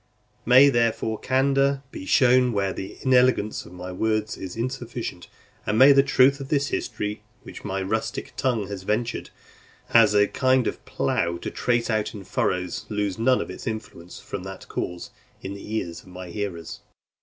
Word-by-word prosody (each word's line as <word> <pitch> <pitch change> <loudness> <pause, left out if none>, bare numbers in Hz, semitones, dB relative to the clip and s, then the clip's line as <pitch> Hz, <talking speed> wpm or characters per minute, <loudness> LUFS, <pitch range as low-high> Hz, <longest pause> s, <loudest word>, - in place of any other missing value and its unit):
May, 130 +3 +8
therefore, 115 -3 0
candour 135 +1 +2
be 95 - -8
shown 125 -1 +4
where 100 -2 0
the 95 - -7
inelegance 125 -4 +2
of - - -14
my 90 +1 -7
words 110 +2 -1
is 95 -2 -7
insufficient, 120 -6 -4 0.4
and 105 - -1
may 135 +4 +8
the 140 0 +7
truth 135 0 +4
of 135 -1 -7
this 145 -1 +1
history, 105 -3 -3 0.2
which - - -10
my 95 0 -2
rustic 110 +3 -3
tongue 115 -6 0
has 100 -1 -6
ventured, 110 +5 -2 0.6
as 110 -3 +6
a 105 0 +5
kind 130 0 +2
of - - -3
plough, 85 0 -1
to - - -6
trace 120 -1 0
out 110 0 -1
in 100 - -8
furrows, 90 -1 -2
lose 105 -1 -2
none 130 +2 +3
of - - -5
its - - -9
influence 105 -5 -6
from 100 -2 -6
that 95 +1 -9
cause, 90 0 -5 0.3
in 95 - -5
the 100 +2 -6
ears 85 -6 -3
of - - -21
my 90 0 -9
hearers. 85 -3 -5
110 Hz, 175 wpm, -24 LUFS, 95-125 Hz, 0.6 s, May